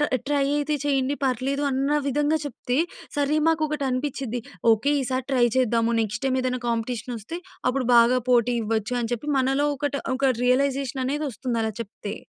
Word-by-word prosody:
ఎ -, -, -1 dB
try 285 Hz, -1 st, +2 dB
అయితే 295 Hz, +1 st, 0 dB
చేయండి 275 Hz, 0 st, +1 dB
పర్లేదు 265 Hz, +2 st, 0 dB
అన్న 275 Hz, +3 st, +1 dB
విధంగా 295 Hz, +3 st, +1 dB
చెప్తే, 250 Hz, -2 st, -3 dB, 0.4 s
సరే 290 Hz, +1 st, +2 dB
మాకొకటనిపించిద్ది, 275 Hz, -5 st, -1 dB, 0.3 s
ఓకే 240 Hz, +7 st, +1 dB
ఈసారి 255 Hz, 0 st, -2 dB
ట్రై 250 Hz, -2 st, +4 dB
చేద్దాము 235 Hz, -2 st, +2 dB
నెక్స్ట్ 215 Hz, +1 st, -3 dB
టైమ్ 260 Hz, -1 st, +1 dB
ఏదైనా 255 Hz, -1 st, -1 dB
కాంపిటీషన్ 235 Hz, +1 st, -2 dB
వస్తే 225 Hz, +11 st, -7 dB, 0.3 s
అప్పుడు 255 Hz, -1 st, -1 dB
బాగా 240 Hz, +2 st, +5 dB
పోటీ 245 Hz, 0 st, +3 dB
ఇవ్వచ్చు 220 Hz, +2 st, -1 dB
అని 230 Hz, +1 st, -3 dB
చెప్పి 270 Hz, +6 st, -4 dB
మనలో 270 Hz, +3 st, +2 dB
ఒకటి, 285 Hz, 0 st, -2 dB, 0.2 s
ఒక 270 Hz, -1 st, +3 dB
రియలైజేషన్ 265 Hz, 0 st, +1 dB
అనేదొస్తుంది 270 Hz, -4 st, -2 dB
అలా 220 Hz, 0 st, -2 dB
చెప్తే! 205 Hz, -1 st, -7 dB
260 Hz, 155 wpm, -24 LUFS, 240-280 Hz, 0.4 s, బాగా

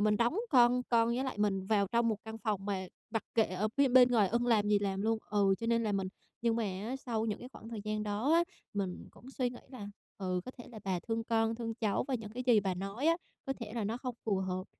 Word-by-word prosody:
mình 210 Hz, 0 st, +3 dB
đóng 240 Hz, -, +2 dB
con 250 Hz, -1 st, +5 dB
con 230 Hz, -1 st, +4 dB
với 250 Hz, +3 st, 0 dB
lại 260 Hz, -5 st, -4 dB
mình 195 Hz, -2 st, +1 dB
vào 205 Hz, -2 st, +3 dB
trong 235 Hz, +2 st, +2 dB
một 215 Hz, -, +1 dB
căn 220 Hz, 0 st, -7 dB
phòng 210 Hz, -3 st, -2 dB
mà 190 Hz, -2 st, -2 dB, 0.2 s
mặc 225 Hz, -, -1 dB
kệ 225 Hz, -, +5 dB
ở 190 Hz, +3 st, -1 dB
phía 280 Hz, -1 st, +5 dB
bên 250 Hz, 0 st, +7 dB
ngoài 215 Hz, -5 st, +4 dB
ưng 240 Hz, +3 st, +1 dB
làm 210 Hz, -3 st, +3 dB
gì 205 Hz, -1 st, +5 dB
làm 195 Hz, -1 st, -1 dB
luôn 225 Hz, 0 st, +1 dB
ừ, 200 Hz, -2 st, +4 dB
cho 230 Hz, -, -3 dB
nên 230 Hz, 0 st, +2 dB
là 215 Hz, -2 st, 0 dB
mình 195 Hz, -1 st, 0 dB, 0.3 s
nhưng 230 Hz, -1 st, +2 dB
mà 230 Hz, -, 0 dB
á, 205 Hz, +7 st, -3 dB
sau 230 Hz, -4 st, -2 dB
những 210 Hz, -, -2 dB
cái 250 Hz, -, -9 dB
khoảng 225 Hz, -4 st, -12 dB
thời 225 Hz, -3 st, -5 dB
gian 215 Hz, 0 st, -1 dB
đó 215 Hz, +8 st, 0 dB
á 340 Hz, -, +5 dB, 0.3 s
mình 190 Hz, -3 st, -3 dB
cũng 260 Hz, -, -14 dB
suy 255 Hz, -2 st, -1 dB
nghĩ 245 Hz, -, -9 dB
là, 210 Hz, -6 st, -7 dB, 0.3 s
ừ, 185 Hz, -2 st, -1 dB
có -, -, -6 dB
thể 245 Hz, -2 st, -12 dB
là 220 Hz, -3 st, -10 dB
bà 185 Hz, -2 st, 0 dB
thương 225 Hz, +2 st, -2 dB
con, 225 Hz, 0 st, +1 dB
thương 225 Hz, -1 st, -4 dB
cháu, 220 Hz, -1 st, 0 dB
và 265 Hz, -, 0 dB
những 220 Hz, -3 st, -4 dB
cái 250 Hz, +3 st, -4 dB
gì 225 Hz, -4 st, +6 dB
bà 190 Hz, -2 st, -1 dB
nói 195 Hz, -, -3 dB
á 335 Hz, +1 st, +5 dB, 0.3 s
có 270 Hz, -, 0 dB
thể 230 Hz, -4 st, -8 dB
là 225 Hz, -3 st, -1 dB
nó 225 Hz, +3 st, -1 dB
không 250 Hz, -1 st, -4 dB
phù 205 Hz, -3 st, +1 dB
hợp, 185 Hz, -1 st, -2 dB
225 Hz, 275 wpm, -33 LUFS, 205-240 Hz, 0.3 s, bên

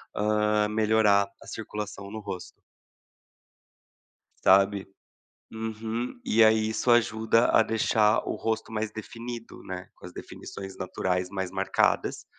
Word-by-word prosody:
hã, 105 Hz, 0 st, +2 dB
melhorar 105 Hz, -2 st, +3 dB
a -, -, -14 dB
circulação 105 Hz, -2 st, -6 dB
no 110 Hz, -, -5 dB
rosto 100 Hz, -4 st, -8 dB, 1.8 s
sabe. 95 Hz, +1 st, +4 dB, 0.7 s
Uhum, 110 Hz, -, -4 dB
e 115 Hz, -, +4 dB
aí 110 Hz, 0 st, +3 dB
isso 110 Hz, +3 st, -1 dB
ajuda 115 Hz, 0 st, +4 dB
a -, -, +5 dB
deixar 110 Hz, -1 st, +2 dB
o -, -, -2 dB
rosto 110 Hz, 0 st, -2 dB
mais 110 Hz, 0 st, -2 dB
definido, 115 Hz, +2 st, -8 dB
né, 90 Hz, -1 st, -7 dB
com -, -, -14 dB
as -, -, -10 dB
definições 95 Hz, -1 st, -9 dB
naturais 90 Hz, -1 st, -2 dB
mais 95 Hz, -2 st, -4 dB
marcadas, 95 Hz, 0 st, 0 dB
105 Hz, 120 wpm, -27 LUFS, 100-110 Hz, 1.8 s, a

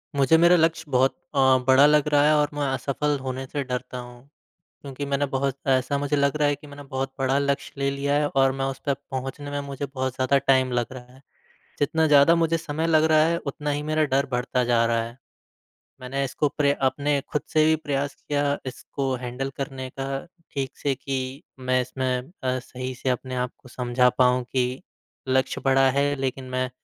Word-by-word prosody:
मुझे 140 Hz, +4 st, +4 dB
मेरा 170 Hz, +2 st, +6 dB
लक्ष्य 165 Hz, -1 st, +2 dB
बहुत 130 Hz, +1 st, +3 dB, 0.2 s
अ, -, -, +2 dB, 0.3 s
बड़ा 130 Hz, +2 st, +7 dB
लग 150 Hz, 0 st, +4 dB
रहा 145 Hz, 0 st, +5 dB
है 155 Hz, -, +5 dB
और 150 Hz, -1 st, +2 dB
मैं 145 Hz, 0 st, -2 dB
असफल 140 Hz, +3 st, -1 dB
होने 130 Hz, 0 st, -4 dB
से 145 Hz, +1 st, -3 dB
डरता 125 Hz, -1 st, -4 dB
हूँ। 120 Hz, 0 st, -10 dB, 0.6 s
क्योंकि 140 Hz, 0 st, -6 dB
मैंने 140 Hz, 0 st, 0 dB
बहुत 135 Hz, 0 st, -1 dB
ऐसा 135 Hz, +1 st, +2 dB
मुझे 145 Hz, +1 st, 0 dB
लग 140 Hz, 0 st, +2 dB
रहा 150 Hz, -1 st, +3 dB
है 145 Hz, -, +1 dB
कि 145 Hz, +1 st, -15 dB
मैंने 145 Hz, 0 st, -10 dB
बहुत 135 Hz, 0 st, -2 dB
बड़ा 135 Hz, +1 st, +2 dB
लक्ष्य 140 Hz, 0 st, -1 dB
ले 140 Hz, 0 st, +1 dB
लिया 140 Hz, +1 st, -1 dB
है 150 Hz, -, +1 dB
और 135 Hz, -1 st, +3 dB
मैं -, -, +1 dB
उस 135 Hz, 0 st, -4 dB
तक 140 Hz, -2 st, 0 dB
पहुँचने 135 Hz, +2 st, -5 dB
में 145 Hz, -, -2 dB
मुझे 140 Hz, 0 st, -4 dB
बहुत 130 Hz, -1 st, -2 dB
ज़्यादा 130 Hz, +2 st, +2 dB
टाइम 130 Hz, -1 st, +4 dB
लग 120 Hz, +1 st, -1 dB
रहा 125 Hz, -1 st, -11 dB
है। 130 Hz, -, -18 dB, 0.6 s
जितना 160 Hz, +2 st, +2 dB
ज़्यादा 150 Hz, +3 st, +6 dB
मुझे 165 Hz, 0 st, +2 dB
समय 160 Hz, 0 st, -3 dB
लग 155 Hz, -1 st, +4 dB
रहा 155 Hz, 0 st, +6 dB
है 170 Hz, +1 st, +1 dB
उतना 145 Hz, +1 st, -3 dB
ही 145 Hz, +1 st, -2 dB
मेरा 155 Hz, +1 st, +1 dB
डर 140 Hz, +1 st, +3 dB
बढ़ता 125 Hz, +1 st, 0 dB
जा 120 Hz, -1 st, +3 dB
रहा 115 Hz, 0 st, +1 dB
है। 115 Hz, +2 st, -9 dB, 0.8 s
मैंने 135 Hz, +2 st, -2 dB
इसको 140 Hz, +3 st, 0 dB
प्र 140 Hz, -1 st, +3 dB, 0.2 s
अपने 145 Hz, +1 st, 0 dB
ख़ुद 150 Hz, -, +1 dB
से 155 Hz, -1 st, +5 dB
भी 160 Hz, 0 st, +4 dB
प्रयास 140 Hz, 0 st, -1 dB
किया 145 Hz, -1 st, -1 dB
इसको 135 Hz, +1 st, -4 dB
हैंडल 125 Hz, +2 st, -3 dB
करने 135 Hz, -2 st, -5 dB
का 135 Hz, -, -2 dB, 0.4 s
ठीक 135 Hz, -1 st, -4 dB
से 140 Hz, -, 0 dB
कि 130 Hz, +1 st, -4 dB, 0.2 s
मैं 130 Hz, 0 st, +1 dB
इसमें 130 Hz, +2 st, -3 dB
अ, 130 Hz, 0 st, 0 dB
सही 130 Hz, +1 st, -6 dB
से 130 Hz, -, -3 dB
अपने 130 Hz, +1 st, -2 dB
आप 125 Hz, 0 st, -1 dB
को 130 Hz, -, -17 dB
समझा 125 Hz, 0 st, +2 dB
पाऊँ 125 Hz, 0 st, +4 dB
कि 125 Hz, 0 st, -1 dB, 0.5 s
लक्ष्य 130 Hz, 0 st, +1 dB
बड़ा 135 Hz, 0 st, +5 dB
है। 140 Hz, +1 st, +1 dB
लेकिन 130 Hz, 0 st, -2 dB
मैं 130 Hz, 0 st, -1 dB
135 Hz, 205 wpm, -24 LUFS, 130-145 Hz, 0.8 s, बड़ा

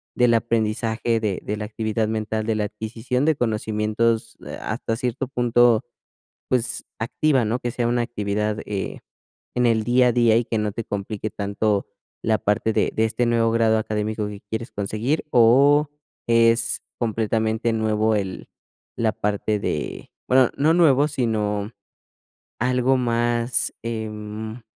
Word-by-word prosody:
del 125 Hz, -1 st, +4 dB
aprendizaje 115 Hz, 0 st, 0 dB
de 105 Hz, -4 st, -1 dB
de 105 Hz, -, -3 dB
la 105 Hz, -, -4 dB
actividad 110 Hz, 0 st, -2 dB
mental, 110 Hz, 0 st, -2 dB
de 110 Hz, -, +1 dB
la 105 Hz, -, 0 dB
adquisición 110 Hz, +5 st, -3 dB
de 160 Hz, 0 st, +3 dB
conocimientos, 110 Hz, 0 st, 0 dB
ah, -, -, -5 dB
hasta 115 Hz, 0 st, -2 dB
cierto 125 Hz, +2 st, -2 dB
punto, 120 Hz, -2 st, +3 dB, 0.7 s
pues, 120 Hz, -1 st, 0 dB
activa, 130 Hz, +3 st, +1 dB
¿no? 110 Hz, +3 st, 0 dB
Que 120 Hz, -1 st, -3 dB
sea 120 Hz, 0 st, 0 dB
una 120 Hz, 0 st, +1 dB
actividad, 105 Hz, -2 st, -2 dB
eh, 100 Hz, -2 st, -4 dB, 0.5 s
en 125 Hz, 0 st, +2 dB
el 110 Hz, -2 st, +2 dB
día 125 Hz, +1 st, +4 dB
a -, -, +2 dB
día 115 Hz, -2 st, +4 dB
y 120 Hz, -, 0 dB
que 115 Hz, -, -2 dB
no 105 Hz, -1 st, -1 dB
te 115 Hz, -, -5 dB
complique 105 Hz, +1 st, -4 dB
tanto 100 Hz, 0 st, -1 dB, 0.4 s
la 110 Hz, -1 st, +2 dB
parte 105 Hz, +2 st, 0 dB
de -, -, +1 dB
de 110 Hz, -, +2 dB
este 120 Hz, +2 st, 0 dB
nuevo 115 Hz, -1 st, +2 dB
grado 115 Hz, -1 st, +3 dB
académico 105 Hz, 0 st, -2 dB
que 105 Hz, -1 st, -8 dB
quieres 115 Hz, +3 st, -4 dB
conseguir. 110 Hz, +10 st, -2 dB
O 140 Hz, +5 st, +5 dB, 0.4 s
es 115 Hz, 0 st, +3 dB, 0.2 s
completamente 110 Hz, 0 st, 0 dB
nuevo 110 Hz, 0 st, +1 dB
el 95 Hz, -3 st, -3 dB, 0.5 s
la 110 Hz, -2 st, +1 dB
parte 105 Hz, +1 st, -1 dB
de, 75 Hz, -6 st, -4 dB, 0.2 s
bueno, 130 Hz, -1 st, +5 dB
no 150 Hz, +3 st, +3 dB
nuevo, 150 Hz, -4 st, +4 dB
sino 110 Hz, -6 st, -1 dB, 0.9 s
algo 125 Hz, +2 st, +2 dB
más, 120 Hz, 0 st, 0 dB
em 110 Hz, 0 st, -5 dB
115 Hz, 150 wpm, -23 LUFS, 105-120 Hz, 0.9 s, O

